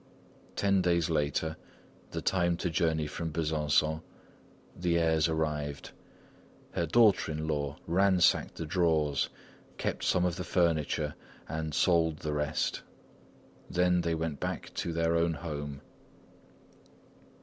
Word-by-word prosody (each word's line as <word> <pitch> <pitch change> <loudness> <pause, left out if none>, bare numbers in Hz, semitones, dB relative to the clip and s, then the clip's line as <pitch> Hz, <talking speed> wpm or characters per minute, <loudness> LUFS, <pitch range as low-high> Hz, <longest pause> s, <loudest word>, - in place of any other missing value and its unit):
Ten 100 -1 +2
days 85 -2 +2
later 80 +1 0 0.5
(the - - -5
time 85 -2 +2
to 90 - -2
journey 80 -2 +1
from 80 +2 -4
Besançon), 75 0 +1 0.7
the 85 -1 +1
heirs 80 -1 +3
arrived. 75 -3 -2 0.8
Her 85 - -1
daughter 105 -2 +4
in 80 +1 -3
law 75 -2 -2
ransacked 95 +1 +3
the 80 - -4
drawers, 80 -4 +1 0.5
kept - - -2
some 90 -1 +2
of 90 -1 -1
the 90 - -3
furniture, 80 -4 +1 0.3
and 80 -2 -3
sold 80 -3 +3
the 75 -1 -3
rest; 75 +1 -1 0.9
then 90 0 +2
they 85 -1 0
went 80 -3 -3
back - - -4
to 85 - -2
their 85 0 +1
own 85 0 +2
home. 75 -4 -5
80 Hz, 125 wpm, -30 LUFS, 75-85 Hz, 0.9 s, daughter